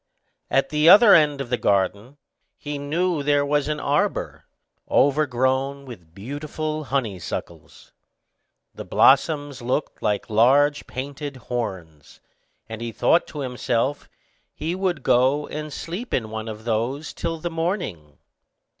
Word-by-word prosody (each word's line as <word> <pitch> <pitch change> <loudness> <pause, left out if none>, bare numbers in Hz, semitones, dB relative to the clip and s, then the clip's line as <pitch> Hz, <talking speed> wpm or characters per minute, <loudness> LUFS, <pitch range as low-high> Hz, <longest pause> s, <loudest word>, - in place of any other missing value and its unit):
At 135 0 +1
the 150 +2 +4
other 205 +3 +9
end 150 -3 +4
of 125 -2 -7
the 125 - 0
garden, 100 +7 0 0.4
he 145 -1 -5
knew 165 +3 -1
there 145 0 +2
was 145 0 0
an 150 -1 -2
arbor, 145 +1 -1 0.4
overgrown 135 -1 +1
with 90 -10 -12
beautiful 150 +7 -5
honey 120 -9 -2
suckles. 80 - -8 0.8
The - - -8
blossoms 145 -4 +3
looked 130 +5 -2
like 105 -1 -1
large 140 +7 +3
painted 140 +2 -6
horns; 95 - -6 0.5
and 110 0 -7
he 115 0 -4
thought 165 +9 +2
to 150 - -7
himself, 125 +1 -2 0.5
he 160 +3 -3
would 180 -6 -2
go 130 +4 +3
and 150 0 -6
sleep 175 - -4
in 110 -3 -3
one 110 0 -5
of 110 0 -8
these 120 +6 -2
till 165 -1 -3
the 170 +2 -5
morning. 165 - -3
140 Hz, 135 wpm, -23 LUFS, 115-150 Hz, 0.8 s, other